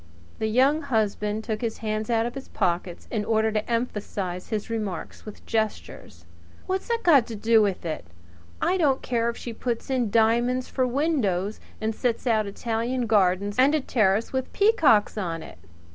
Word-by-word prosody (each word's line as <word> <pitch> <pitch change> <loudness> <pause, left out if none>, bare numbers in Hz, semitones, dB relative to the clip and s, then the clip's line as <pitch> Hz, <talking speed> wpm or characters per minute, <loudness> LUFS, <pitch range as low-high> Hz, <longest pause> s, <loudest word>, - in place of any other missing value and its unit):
The 220 - 0
Young 265 +7 +3
Husband 215 -5 -1
took 215 -1 -3
his 230 -2 -2
hands 215 0 -3
out 230 -1 +2
of 240 - -4
his 270 0 -8
pockets 175 -2 -2
in 220 -3 -1
order 220 0 +1
to 215 +1 -2
emphasize 205 -6 -3
his 215 -2 -2
remarks 215 -5 -5
with 210 - -10
gestures. 220 -1 -3 0.4
"What's 380 0 -2
that 465 -1 0
got 285 -9 +5
to 230 - -6
do 225 +1 +4
with 195 -4 -1
it? 155 - -4 0.6
I 370 - +2
don't 280 -6 +2
care 235 -1 0
if 235 - -5
she 235 - -6
puts 235 +2 -3
in 250 -4 +1
diamonds 235 +4 +2
for 255 -1 0
windows 240 - 0 0.2
and 220 +1 -1
sets 235 +2 -1
out 220 -4 +2
Italian 235 +4 -2
gardens 200 -1 +2
and 280 +4 +5
a - - +2
terrace 215 -3 +1
with 260 -1 -2
peacocks 315 - +4
on 165 -4 -3
it. - - -12
225 Hz, 175 wpm, -25 LUFS, 210-250 Hz, 0.6 s, got